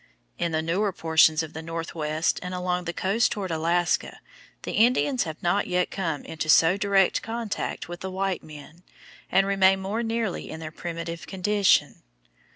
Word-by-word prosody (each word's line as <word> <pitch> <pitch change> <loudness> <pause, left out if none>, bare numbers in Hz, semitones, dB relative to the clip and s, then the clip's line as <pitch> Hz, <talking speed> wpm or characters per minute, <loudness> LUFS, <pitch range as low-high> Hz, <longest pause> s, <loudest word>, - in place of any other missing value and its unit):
In 170 - 0
the 160 0 0
newer 190 +5 0
portions 160 -2 +3
of 160 - -8
the 160 - -6
Northwest 160 -1 -2
and 180 0 -5
along 180 0 -2
the 170 - -2
coast 200 +7 +1
toward 195 -4 -3
Alaska 170 +2 0 0.4
the - - -4
Indians 250 +2 +2
have 160 -1 -7
not 175 +4 +1
yet 180 0 0
come 165 -7 -3
into 155 -1 -5
so 165 +3 +6
direct 200 -2 +2
contact 225 -2 -4
with 175 +1 -7
the 190 - -5
white 190 0 -2
men, 155 +2 -13 0.5
and 195 - +4
remain 195 -1 +4
more 200 +4 -2
nearly 225 -4 -2
in 160 - -7
their 155 -1 -7
primitive 165 0 -6
condition. 200 +1 +2
180 Hz, 165 wpm, -25 LUFS, 165-195 Hz, 0.5 s, so